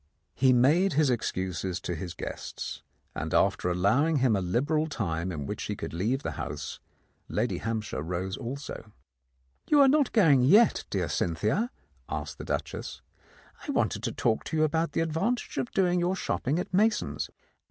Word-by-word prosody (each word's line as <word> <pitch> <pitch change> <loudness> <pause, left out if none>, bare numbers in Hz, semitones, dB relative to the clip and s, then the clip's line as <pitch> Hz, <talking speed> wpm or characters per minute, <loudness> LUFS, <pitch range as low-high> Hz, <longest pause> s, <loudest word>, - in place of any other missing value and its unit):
He 130 0 +4
made 150 +10 +4
his 145 -2 +3
excuses 95 -5 -2
to 90 - -3
his 85 +1 -6
guests, - - -6 0.3
and - - -3
after 90 - +2
allow 100 - +3
ing 165 - +1
him 130 -5 +3
a 95 - 0
liberal 145 - +1
time 90 - -2
in 75 -5 -4
which - - -4
he - - -3
could - - -6
leave 115 - -1
the - - -2
house, - - -5 0.5
Lady - - -1
Hampshire 110 -7 -3
rose 90 +4 -3
also. 125 -3 -7 0.8
"You 295 - +5
are 280 - +8
not 285 0 +3
going 160 - +5
yet, 205 - +5
dear 90 -4 -1
Cynthia?" 105 - 0 0.4
asked - - -5
the - - -6
Duchess. - - -4 0.6
"I - - -7
wanted 180 - 0
to 115 0 -2
talk 110 0 0
to 160 - -2
you 155 - +4
about 160 +2 +1
the - - +1
ad 165 -1 -1
vantage 230 +10 -1
of 240 - -2
doing 180 -2 +2
your 175 +2 +1
shopping 145 -5 -1
at 180 - -4
Mason's. 210 +3 +1
130 Hz, 175 wpm, -28 LUFS, -, 0.8 s, are